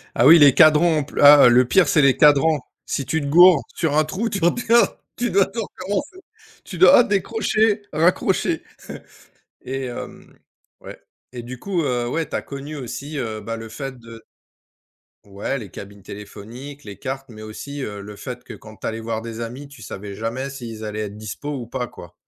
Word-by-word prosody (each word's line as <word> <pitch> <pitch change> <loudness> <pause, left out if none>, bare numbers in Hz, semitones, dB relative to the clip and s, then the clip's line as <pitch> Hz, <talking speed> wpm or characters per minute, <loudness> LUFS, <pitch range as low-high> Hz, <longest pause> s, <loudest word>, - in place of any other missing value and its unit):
Ah 120 - +3
oui, 165 +2 +9
les 140 -3 +7
cadrans 155 0 +5
pl 145 - -8
ah, 145 -2 +9
le 125 +1 +5
pire, 190 +6 +4
c'est 155 - +3
les 135 -2 +4
cadrans, 150 +1 +4 0.3
si 140 - -3
tu 160 +3 -1
te - - -4
goures 175 +1 +6
sur 155 -3 0
un 155 - +4
trou, 195 +9 -3
tu 195 - -3
redéma 235 +6 +3 0.2
tu 240 0 -1
dois 195 0 +4
tout 230 - -5
recommencer, 225 - -5 0.4
tu 185 - -9
dois 185 +7 +7
décrocher, 215 +1 0
raccrocher 165 +4 +1 1.0
et 135 0 -4
hem, 120 - -9 0.5
ouais - - -11 0.3
et 120 -1 -7
du 125 +1 -9
coup, 185 -1 -2
heu, 125 -3 -1
ouais, 160 +5 -2
tu - - -6
as - - -1
connu 140 +2 -8
aussi, 140 +3 -7
heu, 110 -4 -4
bah, 115 +1 -5
le 115 0 -9
fait 135 +3 -7
de 115 -1 -13 1.0
Ouais, 100 +7 -4
les 110 -7 -8
cabines 100 0 -11
téléphoniques, 115 +9 -10
les 100 -2 -9
cartes 135 0 -5
mais 110 -2 -12
aussi, 140 +7 -8
heu, 105 -3 -6
le 105 +1 -10
fait - - -8
que - - -10
quand - - -13
tu - - -6
allais 110 0 -4
voir 110 0 -4
des 115 0 -7
amis, 125 +5 -7
tu 140 -1 -15
savais 100 0 -8
jamais 115 +6 -4
s'ils 115 -5 -8
allaient 105 0 -4
être 100 0 -9
dispo 110 +7 -7
ou 125 -4 -5
pas, 125 0 -4
quoi. 85 - -13
135 Hz, 195 wpm, -21 LUFS, 115-160 Hz, 1.0 s, oui